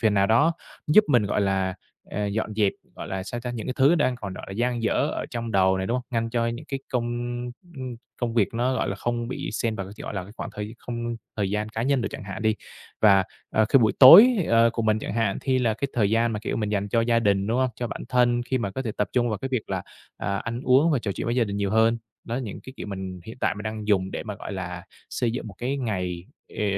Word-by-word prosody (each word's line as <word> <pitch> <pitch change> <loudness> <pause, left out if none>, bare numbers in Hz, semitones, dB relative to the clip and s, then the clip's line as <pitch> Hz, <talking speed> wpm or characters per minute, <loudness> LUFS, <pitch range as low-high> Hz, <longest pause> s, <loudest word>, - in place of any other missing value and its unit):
Phiền 110 -3 +3
nào 100 0 +4
đó 145 +9 +4 0.3
giúp 210 +8 +6
mình, 125 -6 +4
gọi 105 - 0
là, 95 -2 0 0.4
ờ, 105 0 -2
dọn 110 +1 -2
dẹp, 105 -2 +2 0.2
gọi - - -7
là, 95 -1 -3
sao 120 +5 -5
ta, 125 - -4
những 115 -3 -5
cái 130 - -2
thứ 140 +5 +5
đang 130 -6 +1
còn, 100 -5 -6
gọi - - -8
là, - - -6
dang 120 +2 -1
dở 110 - +1 0.2
ở - - -3
trong 115 -1 -4
đầu 95 -1 +3
này, 95 - -2
đúng 115 - -1
hông? 125 - -1
Ngăn 115 -1 -1
cho 115 0 0
những 120 +5 -4
cái 135 - -2
công, 120 -2 +1 0.6
ưm, 175 - -20
ưm, 130 -2 -5 0.2
công 120 -1 -1
việc 115 -1 +2
nó, 125 +2 +1
gọi - - -1
là, 95 - -1
không 120 +1 -2
bị 130 - -4
xen 115 -2 -1
vào, 95 - -4
cái - - -9
gọi - - -5
là, 100 - -2
cái 100 - -13
khoảng - - -5
thời 105 +2 -5
không 120 -1 -4 0.2
thời 100 -3 0
gian 105 +1 -1
cá 110 +1 -3
nhân 135 -1 +2
được 100 - -1
chẳng - - -7
hạn 95 +2 -6
đi. 110 0 +3 0.5
Và, 100 -3 +6 0.3
à, 110 - +3
khi 135 - +6
buổi 110 -3 +3
tối, 170 - +11 0.2
ờ, 115 0 +5
của 115 - -2
mình 110 0 +2
chẳng - - -5
hạn 115 -4 0
thi 130 -2 +1
là 115 -4 +1
cái 140 +4 -3
thời 105 -4 +2
gian 115 +1 +2
mà, 105 - -2
kiểu, - - -3
mình 105 -2 -1
dành 100 -1 -1
cho 115 - +2
gia 115 0 +3
đình, 100 -2 +2
đúng 115 +3 0
hông? 130 -1 +2
Cho 120 - -2
bản - - -6
thân 120 -1 +3
khi 130 +1 -1
mà 100 -5 -2
có 130 - -4
thể 110 - -3
tập 105 - 0
trung 120 -1 +2
vào 105 -3 -2
cái 135 - -4
việc 125 -5 -3
là, - - -1 0.3
à, 100 +2 -2
ăn 115 +5 -4
uống 135 +6 +4
và 140 - +2
trò 100 -4 -3
chuyện - - -5
với 120 - 0
gia 120 - +4
đình 100 -2 -4
nhiều 100 -1 -1
hơn. 115 +1 +3 0.3
Đó, 115 - -3
những 120 -6 -5
cái 130 - -10
kiểu - - -6
mình 95 -2 -6
hiện 110 +3 -9
tại - - +1
mình 105 - -7
đang 110 -1 -4
dùng 95 -2 +2
để - - -4
mà, 105 -2 -5
gọi 100 - -7
là, 90 -2 -5 0.3
xây 120 -2 0
dựng 115 -1 -4
một 100 - -11
cái 130 +4 -1
ngày, 90 -8 -3 0.3
ờ, - - +1
115 Hz, 285 wpm, -25 LUFS, 100-120 Hz, 0.6 s, tối